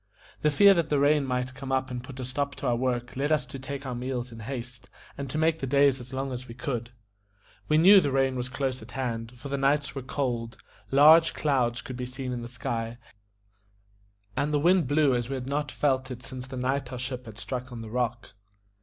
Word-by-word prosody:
The 150 - +4
fear 200 +7 +7
that 170 -4 0
the 150 - +2
rain 145 0 +3
might 125 0 -1
come 135 0 -7
and 130 -2 -1
put 130 0 -10
a 130 - -3
stop 140 +3 -2
to - - -7
our 120 -2 +2
work 125 0 -2
led 140 +3 0
us 150 -5 +2
to 135 +2 -8
take 140 +2 -6
our 130 - -3
meals 125 0 -3
in 115 - -10
haste, 125 +1 -7 0.3
and 140 -1 -5
to 150 - -3
make 160 +1 +2
the 135 - -3
days 140 0 +4
as 125 +1 -10
long 135 0 -3
as 125 0 -6
we 115 - -9
could 120 -2 -3
see. 120 - -25 0.7
We 155 - +3
knew 190 +5 +8
the 145 -4 0
rain 135 -1 +2
was 125 0 -3
close 130 -2 -2
at 115 +3 -12
hand, 115 -3 -3
for 140 +4 -8
the 140 0 -1
nights 140 +1 +2
were 135 - -4
cold; 125 -3 -3 0.3
large 155 +4 +7
clouds 125 -5 +1
could 125 - -7
be 125 -1 -4
seen 125 0 -5
in 120 -1 -3
the 120 - -6
sky, 120 -1 -4 1.4
and 145 +1 0
the 150 - +2
wind 175 0 +4
blew 145 -1 +3
as 120 0 -1
we 135 - -2
had 130 -1 -4
not 145 0 -1
felt 130 -2 0
it 125 -1 -7
since 130 0 -7
the 130 0 -7
night 130 +1 -1
our 125 - -5
ship 125 0 -5
had 110 -1 -10
struck 125 +2 -5
on 120 -2 -6
the 110 - -8
rock. 120 -1 -2
130 Hz, 235 wpm, -27 LUFS, 125-140 Hz, 1.4 s, knew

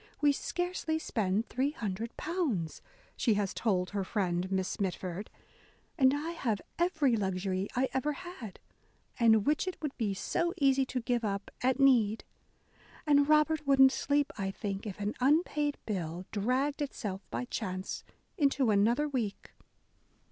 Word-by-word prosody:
We 290 -1 +5
scarcely 355 +1 -2
spend 215 -7 -1
£300," 235 - -2 0.3
she 225 -4 +2
has 200 -2 -1
told 185 -5 0
her 200 -1 -1
friend 185 -2 -1
Miss 190 +3 -1
Mitford, 190 0 -3 0.7
"and 260 -3 +5
I 310 +3 -3
have 235 -11 -1 0.2
every 315 -8 +2
luxury 190 -1 -1
I 260 +2 +2
ever 265 +3 0
had, 280 - -9 0.6
and 220 -3 +5
which 300 +5 +1
it 370 - -4
would 300 -3 -4
be 205 -4 0
so 345 - -1
easy 270 -3 +3
to 255 -1 -2
give 240 0 0
up, 200 -1 -3
at 260 +2 +2
need: 235 -6 +4 0.8
and 285 -1 +4
Robert 305 -1 +3
wouldn't 270 -1 +7
sleep, 285 +1 0
I 195 -1 -1
think, 195 +1 -4
if 200 - -6
an 205 +1 -1
unpaid 295 +1 +2
bill 180 -3 -3
dragged 255 +8 0
itself 210 -9 -4
by 250 - -3
chance 185 -6 -4 0.4
into 275 -5 +3
another 230 +9 +3
week." 235 -8 -3
240 Hz, 140 wpm, -31 LUFS, 200-290 Hz, 0.8 s, wouldn't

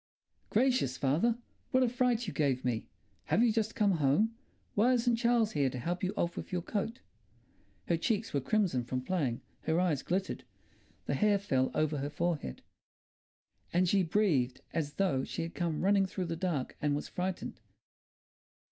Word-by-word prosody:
"Gracious, 245 - +2
father! 165 - +2 0.3
What 260 0 +4
a - - +4
fright 245 -1 +1
you 190 - -4
gave 135 -5 +1
me! 120 -3 -1 0.4
Have 230 - +3
you 235 - +4
just 220 0 -1
come 210 -2 +3
home? 155 +11 +3 0.4
Why 235 +5 +4
isn't 240 -1 +2
Charles 235 -2 +3
here 140 -8 +2
to 130 - -6
help 175 +10 -3
you 185 - +1
off 170 - 0
with - - -6
your 180 -2 -1
coat?" 225 +5 -3 0.9
Her 170 - +2
cheeks 215 +5 -1
were 140 - +1
crimson 175 - +1
from 125 +2 -3
playing, 135 -7 -1 0.2
her 160 +1 +2
eyes 165 -7 +1
glittered, 190 +2 -2 0.6
the - - -1
hair 210 -1 +3
fell 135 -10 +1
over 155 -1 +1
her 140 +1 -2
forehead. 165 - -2 1.1
And 180 +1 +3
she 195 +2 +4
breathed 160 -9 +1
as 150 -3 -1
though 150 -9 +1
she - - -3
had 165 - -5
come 170 -3 -1
running 195 -1 +4
through 185 -1 -3
the 165 -1 -3
dark 165 -6 -2
and 150 -1 +2
was 145 - -3
frightened. 180 0 -4
180 Hz, 175 wpm, -32 LUFS, 145-215 Hz, 1.1 s, What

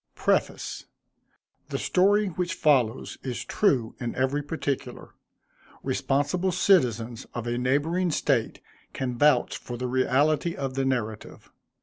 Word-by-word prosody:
Y. - - -16
PREFACE. - - 0 0.8
The - - -2
story 205 +3 +3
which 180 0 -3
follows 130 -6 +1
is 125 -3 -4
true 130 - +1
in 120 -2 -4
every 135 +3 0
particular. 145 -2 -4 0.7
Responsible 145 +7 0
citizens 120 - +2
of 120 -1 -4
a 120 0 -1
neighboring 150 +8 +1
State 135 -6 0 0.3
can 125 -2 -3
vouch 140 -1 +3
for 120 - -7
the 125 - -3
reality 140 +6 +1
of 135 -1 -3
the 135 0 -1
narrative. 110 -5 -3
135 Hz, 125 wpm, -26 LUFS, 125-155 Hz, 0.8 s, story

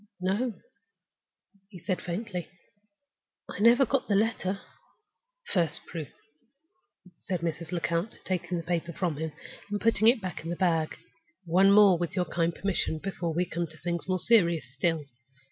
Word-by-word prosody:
"No," 205 +6 0 1.1
he 195 - -11
said, 180 +2 -2
faintly; 180 -1 -4 1.0
"I - - -7
never 235 +5 +6
got 270 +2 0
the 205 - +2
letter." 200 -2 0 0.9
"First 170 -6 0
proof!" 160 -4 -6 1.1
said 175 +1 -4
Mrs. 165 -1 -3
Lecount, 170 +3 -1
taking 180 -1 -2
the 165 - -4
paper 170 0 -2
from 170 -3 -1
him, 160 +1 -3 0.4
and 205 0 -1
putting 225 -1 +3
it 235 +1 +6
back 185 -5 -5
in 165 - -5
the 175 - -1
bag. 165 -4 +1 0.5
"One 185 +4 +5
more, 200 -4 +7
with 175 +1 -3
your 180 -2 +1
kind 170 0 0
permission, 195 -4 -1
before 170 -2 -3
we 180 +2 +2
come 170 0 -3
to 155 0 -15
things 170 +1 -3
more 185 -1 +1
serious 170 -5 +3
still. 155 +2 0
175 Hz, 155 wpm, -28 LUFS, 165-200 Hz, 1.1 s, more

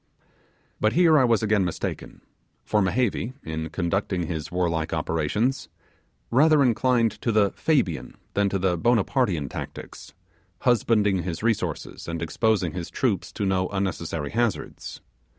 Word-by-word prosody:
But 110 +1 +2
here 165 -3 +5
I - - +4
was 115 -2 +2
again 105 -2 +2
mistaken; 85 -2 -4 0.4
for 105 - +2
Mehevi, 110 +4 0
in 80 0 -4
conducting 90 0 -1
his 80 0 -5
warlike 85 -3 -1
operations, 80 - -1 0.6
rather 150 +3 +5
inclined 120 -2 +2
to 115 - 0
the 105 -2 +3
Fabian 130 - -1 0.2
than 100 0 +2
to 100 - -1
the 90 -2 0
Bonapartean 110 - +1
tactics, - - -8 0.5
husbanding 105 -5 +2
his 85 +1 -5
resources 115 -2 -2
and 85 0 -3
exposing 95 +1 0
his 90 -2 -5
troops - - -1
to 100 - -2
no 95 -1 +1
unnecessary 85 -6 -3
hazards. 120 -1 -2
100 Hz, 135 wpm, -25 LUFS, 85-115 Hz, 0.6 s, here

